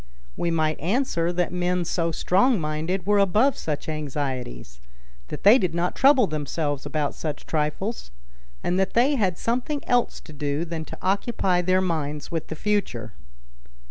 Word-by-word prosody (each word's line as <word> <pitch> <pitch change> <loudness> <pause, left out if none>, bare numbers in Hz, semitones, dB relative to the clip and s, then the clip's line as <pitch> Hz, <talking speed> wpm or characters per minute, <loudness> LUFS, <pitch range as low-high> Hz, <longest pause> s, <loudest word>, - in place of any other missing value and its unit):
We 170 - -1
might 155 -2 0
answer 175 - 0
that 180 0 -1
men 180 0 0
so 165 0 0
strong 200 - +2
minded 160 +4 -2
were 205 0 +3
above 210 +8 +3
such 150 -2 -4
anxieties—that - - -6
they 215 +6 +8
did 180 -4 -1
not 175 +1 0
trouble 265 -3 +5
themselves 150 -2 -3
about 150 -2 -1
such 155 -2 -5
trifles—and 65 - -4
that 190 - 0
they 255 +5 +4
had 190 -10 +1
something 255 +5 -2
else 245 -1 +1
to 155 - -13
do 145 +2 -2
than 165 -1 -5
to - - -9
occupy 190 -2 +1
their 185 +1 +2
minds 150 -5 -2
with 165 -2 -3
the 160 - -5
future. 150 - -1
165 Hz, 150 wpm, -25 LUFS, 145-195 Hz, -, they